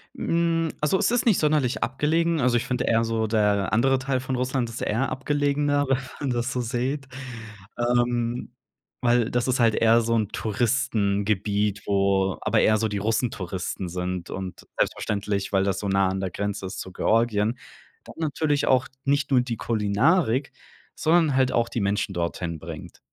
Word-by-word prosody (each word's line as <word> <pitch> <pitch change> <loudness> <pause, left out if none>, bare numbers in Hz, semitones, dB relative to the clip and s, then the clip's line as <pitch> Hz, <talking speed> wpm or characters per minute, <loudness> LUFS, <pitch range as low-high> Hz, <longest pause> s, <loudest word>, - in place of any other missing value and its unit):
Hm, 165 -1 0
also, 150 +5 +2
es - - +2
ist 245 -1 +1
nicht 225 -6 +4
sonderlich 150 -5 +1
abgelegen. 160 +5 +1
Also, 125 -1 +3
ich 120 - -2
finde 125 -1 -1
eher 115 0 +3
so 115 -1 -1
der 105 -3 +1
andere 135 +4 +3
Teil 130 0 -1
von 130 +1 -3
Russland, 125 0 -1
das 115 - -9
ist - - -6
eher 115 +6 0
abgelegener, 145 0 0
wenn 135 -1 +2 0.2
man 140 - -2
das 120 0 -1
so 125 - -2
seht, 130 +4 -2 0.7
ähm, 120 0 0 0.5
weil 120 -2 +2
das 120 0 0
ist 130 0 +1
halt 115 -1 +4
eher 115 +1 +4
so 115 0 0
'n 110 -2 +1
Touristengebiet, 105 -3 0
wo 95 -2 +2
aber - - +2
eher 110 - +4
so 110 +1 0
die 105 - -2
Russentouristen 100 -4 -2
sind 90 0 -4
und 95 -1 -7
selbstverständlich, 100 -1 -1
weil 95 -1 +3
das 95 -1 0
so 100 - -3
nah 95 -1 +2
an 95 +1 -2
der 95 -1 -3
Grenze 100 0 -3
ist 95 - -6
zu 95 - -7
Georgien. 110 +2 +1 0.5
Dann - - -12
natürlich 150 -2 0
auch 130 0 +3 0.2
nicht 145 +1 +1
nur 130 -2 +5
die 120 -2 -4
Kulinarik, 115 - +1 0.4
sondern 160 -3 +3
halt 130 -1 +3
auch 115 -1 +1
die 115 - -2
Menschen 100 0 0
dorthin 85 -1 -3
bringt. - - -9
115 Hz, 175 wpm, -25 LUFS, 100-135 Hz, 0.7 s, nur